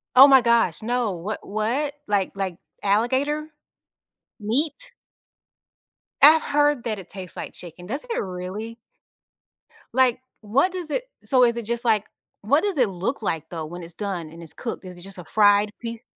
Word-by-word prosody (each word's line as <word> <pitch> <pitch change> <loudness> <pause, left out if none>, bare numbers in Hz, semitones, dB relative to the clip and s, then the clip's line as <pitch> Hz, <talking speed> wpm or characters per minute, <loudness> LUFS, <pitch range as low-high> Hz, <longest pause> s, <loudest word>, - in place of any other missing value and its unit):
Oh 270 +2 +11
my 265 -2 +7
gosh, 235 -8 +2
no 240 -2 0
wha 185 +5 -4
what? 235 +8 -1
Like 200 -2 +1
like 190 -3 -3 0.3
alligator? 265 +9 +1 0.9
Meat? 290 - -2 1.3
I 310 +3 +9
heard 290 -4 +1
that 215 -4 -2
it 185 - -12
tastes 185 -2 -9
like - - -6
chicken; 175 0 -10
doesn't 290 - -5
it - - 0
really? 195 +5 -6 1.2
Like, 255 -2 +4 0.2
what 265 - +2
does 360 -4 -6
it - - -1 0.2
so 255 -2 +3
is 235 -1 +3
it 235 - -4
just 235 +1 -3
like 215 -2 +3 0.4
what 280 - +2
does 400 -7 -1
it 245 -5 +3
look 195 +8 -3
like 165 -7 -2
though 160 -3 -5
when 175 +3 -8
it's 165 0 -11
done 180 -6 -4
and 165 +1 -11
it's 160 - -12
cooked? 230 -4 -6
Is 180 -1 -9
it - - -12
just 195 0 -11
a - - -7
fried 205 +2 +4
pie 230 0 -6
225 Hz, 175 wpm, -24 LUFS, 190-265 Hz, 1.3 s, Oh